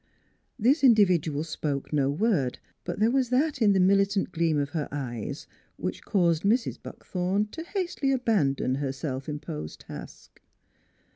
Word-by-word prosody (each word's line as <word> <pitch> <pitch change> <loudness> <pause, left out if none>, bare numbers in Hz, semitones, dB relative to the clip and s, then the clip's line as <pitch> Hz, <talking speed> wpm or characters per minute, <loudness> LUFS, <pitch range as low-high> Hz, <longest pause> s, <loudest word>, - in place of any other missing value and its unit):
This 260 +7 +3
in 245 -4 +8
dividual 170 -7 +2
spoke 150 -3 -4
no 140 -2 +2
word, 145 - +1 0.3
but 175 - -3
there 220 +2 +3
was 260 -2 +1
that 275 +2 +1
in 205 -2 +5
the 190 - +3
militant 195 +1 +3
gleam 165 -2 +1
of 145 0 -1
her 155 -2 -2
eyes 125 -6 -5 0.3
which - - -4
caused 170 -5 +2
Mrs. 230 +6 +1
Buckthorn 190 +3 -2
to 325 - -6
hastily 345 -6 -2
abandon 195 - +1
her 135 -2 -1
self 135 0 -5
imposed 110 - -6
task. - - -11
180 Hz, 150 wpm, -27 LUFS, 145-230 Hz, 0.3 s, in